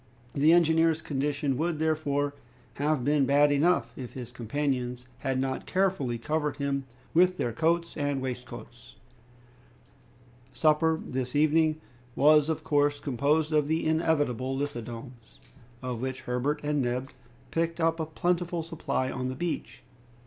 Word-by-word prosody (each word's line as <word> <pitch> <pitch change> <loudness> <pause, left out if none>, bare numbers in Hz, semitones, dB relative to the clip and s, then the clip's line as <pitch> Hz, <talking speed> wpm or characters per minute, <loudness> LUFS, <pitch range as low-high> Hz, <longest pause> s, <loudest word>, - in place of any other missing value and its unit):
The 150 +3 +4
engineer's 165 -1 +4
condition 145 -2 -1
would, 165 +1 0
therefore, 145 -2 0 0.4
have 145 -3 0
been 145 -2 +3
bad 145 +1 +5
enough, 165 +6 +2
if 125 -2 -8
his 125 -2 -7
companions 125 0 -2
had 135 -1 -1
not 130 0 -2
carefully 185 -11 0
covered 150 +3 -2
him 140 -1 -1 0.3
with 180 +2 +4
their 120 -8 -1
coats 170 +5 0
and 145 -2 -1
waistcoats. 120 -2 -7 1.6
Supper, 160 +2 +3
this 130 0 -3
evening, 155 +1 +3 0.4
was 150 +2 +5
of 160 - -2
course 145 -1 +2
composed 150 +4 +1
of 150 -2 +3
the 160 +1 0
inevitable 145 -5 +1
lithodomes, 120 -3 -6 0.4
of 125 -2 -3
which 130 0 -3
Herbert 125 +4 -1
and 150 -1 +1
Neb 125 +2 -2 0.4
picked 165 0 -1
up 165 0 +1
a 160 - -2
plentiful 175 +1 -1
supply 155 -5 -2
on 130 -1 -3
the 130 - -4
beach. 170 -2 -4
145 Hz, 135 wpm, -28 LUFS, 130-160 Hz, 1.6 s, bad